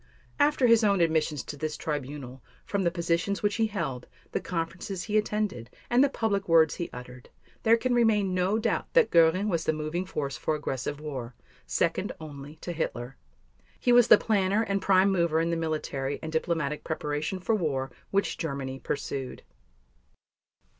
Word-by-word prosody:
After 290 -2 +3
his 230 -1 +5
own 200 -2 +3
admissions 160 -3 +1
to - - -7
this 155 +1 -4
Tribunal, 140 -3 -5 0.2
from 200 - -1
the 175 - +2
positions 170 +3 -1
which 205 0 +1
he 225 -1 +2
held, 165 - -4 0.2
the - - 0
conferences 180 +2 -4
he 215 - -3
attended, 210 - -1 0.2
and 245 +3 +5
the 280 - +3
public 205 -7 -1
words 160 -2 +5
he 170 - -4
uttered, 125 0 -10 0.3
there 230 0 +5
can 250 +2 0
remain 215 -5 +3
no 185 +3 +1
doubt 225 - -1
that - - +4
Göring 170 +5 +4
was 170 -5 0
the 160 - +1
moving 155 +4 -3
force 140 -6 -3
for 155 - -1
aggressive 140 -1 -3
war, 130 -6 -6 0.3
second - - 0
only 145 -1 -9
to 175 - -4
Hitler. 125 -6 -4 0.6
He 245 - +2
was 240 -1 +7
the - - +9
planner 205 0 +1
and 200 -3 -1
prime 190 0 +4
mover 170 -4 +2
in 165 +1 0
the - - +1
military 155 -4 -2
and 160 - -4
diplomatic 160 -2 -1
preparation 155 +3 -3
for 185 +5 0
war 140 - -1 0.2
which 200 +1 0
Germany 135 -4 -4
pursued. 135 -2 -4
165 Hz, 170 wpm, -28 LUFS, 145-200 Hz, 0.6 s, the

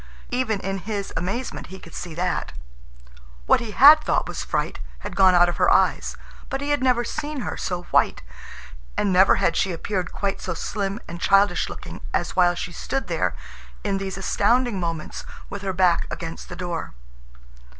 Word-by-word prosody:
Even 245 -5 0
in 195 0 -3
his 200 +1 -4
amazement 195 +10 -3
he 190 - -9
could 165 - -13
see 170 -3 -6
that. 180 +1 -2 0.9
What - - +5
he 230 - -5
had 290 +8 +8
thought - - +1
was - - -4
fright - - -2 0.2
had - - -6
gone 190 -2 +6
out 175 0 +6
of 175 - -2
her - - +4
eyes. - - +2 0.3
But 270 -2 -2
he 285 +1 -2
had 290 - +1
never 250 -2 +3
seen 290 +3 -4
her - - -3
so 175 -1 -3
white, - - +2 0.7
and 200 -2 +2
never 190 +2 +6
had 165 - +1
she 190 - +1
appeared 180 +2 -3
quite 195 -1 -2
so 185 - -3
slim 200 +3 -3
and 170 +1 -8
childish 195 -2 +3
looking - - -9
as - - -1
while 175 -1 +4
she 175 - -4
stood 270 +9 -3
there - - 0 0.5
in 195 -2 0
these 195 -1 -4
astounding 230 +3 +1
moments 165 -3 -4 0.3
with 200 - -5
her 195 -1 -1
back 180 -2 +2
against 165 0 -6
the 175 - -6
door. 175 - -4
195 Hz, 180 wpm, -24 LUFS, 175-220 Hz, 0.9 s, had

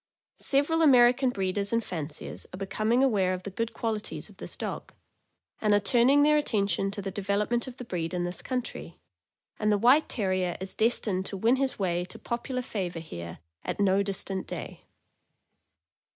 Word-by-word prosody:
Several 290 +4 +1
American 255 -2 +6
breeders 200 -2 -1
and 230 0 +1
fanciers 155 -5 -6
are - - -7
becoming 215 +6 +1
aware 195 -8 +2
of 185 - -9
the 200 - -6
good 230 +4 -2
qualities 225 -2 -3
of - - -17
this - - -5
dog, - - -5 0.7
and 210 -1 +4
are - - +5
turning 245 +8 +4
their 300 0 +5
attention 200 -8 +1
to 200 0 -5
the 195 - -3
development 205 +5 0
of 250 - -8
the 250 - -7
breed 170 -6 -3
in 180 -1 -1
this 175 +1 -3
country, 250 -2 -5 0.6
and 210 0 +2
the 205 - +4
White 250 +9 +5
Terrier 185 -5 0
is 190 +1 -3
destined 210 -4 +1
to 195 - -4
win 230 +7 +3
his 270 0 0
way 175 -3 0
to 185 - -8
popular 250 +2 -3
favor 185 -8 -4
here 85 - -7 0.3
at - - -4
no 195 -1 +3
distant 195 -1 -3
day. - - -7
205 Hz, 175 wpm, -28 LUFS, 190-240 Hz, 0.7 s, American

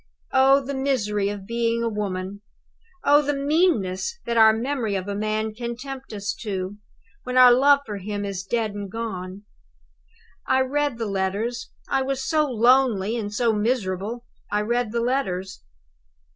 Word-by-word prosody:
Oh, 270 +1 +5
the 280 - -4
misery 215 -7 0
of 205 -2 -6
being 235 +1 0
a - - +1
woman! 200 -2 -4 0.6
Oh, 290 +1 +6
the 290 0 -1
meanness 285 - +1
that 235 - -2
our 220 -1 +7
memory 230 -2 -2
of 190 0 -3
a 200 - -2
man 215 +1 -2
can 235 +1 -5
tempt 270 +1 -8
us 205 -1 -3
to, 195 -2 -4 0.4
when 250 0 -3
our 250 -1 +9
love 280 +3 +5
for 210 -2 -5
him 205 +1 -4
is 195 -2 -4
dead 220 +2 -1
and 205 -1 -6
gone! 195 -4 -5 1.0
I 260 0 +3
read 285 -1 0
the 230 - -3
letters 205 +4 -2 0.2
I 270 - +1
was 265 0 -2
so 305 -1 +2
lonely 235 -3 +3
and 210 -3 -3
so 225 +2 +1
miserable, 215 0 -2 0.3
I 210 - +1
read 235 +1 -1
the 235 0 -1
letters. 190 - -2
230 Hz, 160 wpm, -24 LUFS, 205-260 Hz, 1.0 s, our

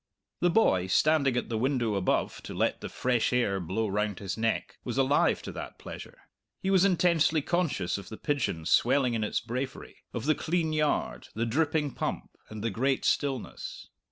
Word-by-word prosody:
The 175 - +3
boy, 95 - +3
standing 140 +4 +3
at - - -2
the 110 -2 -1
window 125 -3 +1
above 100 -2 0
to - - -7
let - - 0
the - - -5
fresh 125 -2 +1
air 120 -6 +1
blow 95 +6 -1
round 105 -1 -1
his 95 -1 -4
neck, 115 0 -2
was 125 0 -4
alive 135 +2 +3
to - - -5
that - - -7
pleasure; - - -10 0.4
he 190 - -1
was 190 -2 +5
intensely 170 -4 +3
conscious 140 - 0
of 100 - -10
the 110 - -7
pigeon 135 - -1
swelling 125 - +3
in 110 -2 0
its 105 - 0
bravery, 125 +3 -5
of 120 0 -4
the 155 - +4
clean 160 0 -1
yard, 150 -1 0
the 115 +2 0
dripping 150 +4 +1
pump, - - -4 0.2
and 110 -1 -7
the 115 - 0
great 130 +6 0
stillness. 135 -4 -2
125 Hz, 185 wpm, -29 LUFS, 110-155 Hz, 0.4 s, was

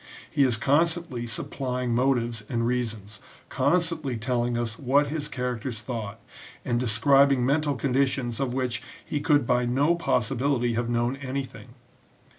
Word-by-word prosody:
He - - +1
is 125 -5 +3
constantly 145 -2 +1
supplying 125 +1 -3
motives 120 -3 +1
and 115 -1 0
reasons, 110 -4 -3 0.3
constantly 165 -7 0
telling 120 +1 -1
us 115 -2 -3
what 140 +2 +2
his 150 0 -3
characters 125 -3 -3
thought, 110 -5 -5 0.5
and 120 -1 +1
describing 130 +3 +4
mental 145 +1 +1
conditions 130 -1 0
of 135 -3 -1
which 125 -1 -2 0.2
he 150 - -2
could 145 -2 +3
by 125 +1 +2
no 140 +7 +3
possibility 130 -5 0
have 120 +1 -1
known 120 +2 0
anything. 130 -2 -6
125 Hz, 135 wpm, -26 LUFS, 120-140 Hz, 0.5 s, describing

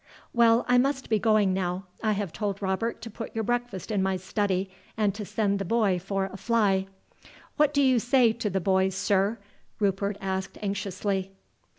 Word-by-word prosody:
"Well, 235 0 +4
I 250 0 +5
must 265 -1 0
be 215 - +3
going 215 -3 +3
now. 185 0 -2 0.2
I 215 -1 +2
have 200 -4 -3
told 200 -2 -2
Robert 210 +4 -2
to 230 - -6
put 225 +2 -7
your 225 - 0
breakfast 240 -4 -2
in 205 -2 +1
my 190 0 +1
study, 190 0 -1 0.3
and 210 -2 +2
to 210 +1 -6
send 200 -1 0
the - - -1
boy 200 -2 +1
for 195 +1 -2
a 195 0 -8
fly." 195 -3 +1 0.7
"What 295 -1 +3
will 285 - +5
you 260 -2 +4
say 240 -1 +4
to 225 -2 -2
the 190 0 0
boys, 190 +1 +1
sir?" 200 +2 +1 0.4
Rupert 200 0 0
asked 190 0 -3
anxiously. 195 -1 -2
200 Hz, 185 wpm, -27 LUFS, 190-230 Hz, 0.7 s, I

